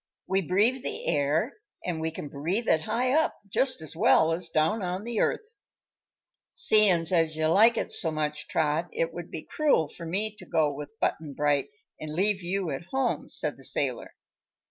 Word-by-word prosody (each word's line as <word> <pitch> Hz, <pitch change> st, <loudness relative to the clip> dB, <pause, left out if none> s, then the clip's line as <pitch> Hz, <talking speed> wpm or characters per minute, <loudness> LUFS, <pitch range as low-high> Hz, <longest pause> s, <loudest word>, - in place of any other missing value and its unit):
We 190 Hz, +1 st, +1 dB
breathe 210 Hz, -, +2 dB
the -, -, -5 dB
air, 150 Hz, -, +1 dB, 0.3 s
an' 175 Hz, -3 st, -2 dB
we 160 Hz, 0 st, -1 dB
can 155 Hz, -2 st, -7 dB
breathe 170 Hz, +12 st, -2 dB
it 160 Hz, -, +3 dB
high 250 Hz, +9 st, 0 dB
up, 315 Hz, +3 st, +2 dB
just 255 Hz, -2 st, 0 dB
as 155 Hz, -, -9 dB
well 160 Hz, 0 st, +4 dB
as 170 Hz, 0 st, -4 dB
down 160 Hz, +7 st, +1 dB
on 180 Hz, +1 st, -3 dB
the 235 Hz, -1 st, -3 dB
earth." 440 Hz, -, 0 dB, 1.1 s
"Seein' 195 Hz, -6 st, +4 dB
as 165 Hz, -2 st, +2 dB
you 155 Hz, 0 st, 0 dB
like 220 Hz, +8 st, +5 dB
it -, -, -2 dB
so 165 Hz, -, +2 dB
much, 150 Hz, -1 st, -3 dB
Trot, 160 Hz, +2 st, 0 dB
it 165 Hz, 0 st, -1 dB
would 175 Hz, -1 st, -7 dB
be 155 Hz, -, -6 dB
cruel 290 Hz, -, +2 dB
for 165 Hz, +3 st, -9 dB
me 210 Hz, +5 st, -1 dB
to 185 Hz, -, -12 dB
go 150 Hz, -2 st, +1 dB
with 145 Hz, +1 st, -7 dB
Butt'n 150 Hz, -3 st, -2 dB
Bright 145 Hz, -1 st, +1 dB, 0.3 s
an' 155 Hz, 0 st, -6 dB
leave 195 Hz, +2 st, +1 dB
you 180 Hz, -1 st, -2 dB
at 135 Hz, +5 st, -5 dB
home," 265 Hz, +6 st, -1 dB
said -, -, -1 dB
the -, -, -12 dB
sailor. -, -, -2 dB
170 Hz, 190 wpm, -27 LUFS, 155-210 Hz, 1.1 s, like